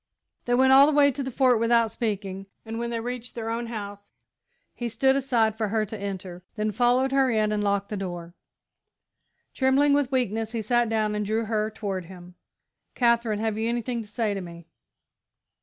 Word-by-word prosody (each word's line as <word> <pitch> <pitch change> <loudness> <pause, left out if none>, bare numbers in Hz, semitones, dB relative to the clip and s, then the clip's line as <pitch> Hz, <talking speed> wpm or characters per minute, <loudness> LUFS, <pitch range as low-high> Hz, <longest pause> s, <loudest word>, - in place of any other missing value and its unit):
They 245 - +2
went 260 +1 +4
all 275 +1 +8
the - - +2
way 285 -1 +6
to 275 +2 -5
the 265 - -3
Fort 255 -2 +3
without 230 -1 +3
speaking, 195 -4 -4 0.2
and 225 +1 -5
when 235 0 -3
they 235 -1 -2
reached 245 +1 -6
their 225 -1 -4
own 235 +1 -3
house, 205 -3 -7 0.6
he 240 -1 -4
stood 265 +4 +2
aside 240 -5 +1
for 220 -1 -1
her 215 +1 0
to 215 - -8
enter, 190 -3 -6
then 215 0 -1
followed 245 +4 +2
her 270 -1 +3
in 215 -2 +1
and 210 -1 -1
locked 200 0 0
the 210 - -4
door. 175 -3 -6 1.2
Trembling 275 +2 +3
with 285 -2 +1
weakness, 225 -3 -1
he 225 -2 -2
sat 240 +1 +1
down 215 -1 0
and 210 0 -1
drew 220 +2 -1
her 215 -1 -1
toward 200 -4 -4
him. 180 0 -12 0.6
"Katherine, 235 -3 +2
have 220 0 -2
you 225 +1 0
anything 240 0 -2
to 215 - -11
say 210 0 -1
to 195 - -4
me?" 170 -1 -10
225 Hz, 195 wpm, -25 LUFS, 205-245 Hz, 1.2 s, all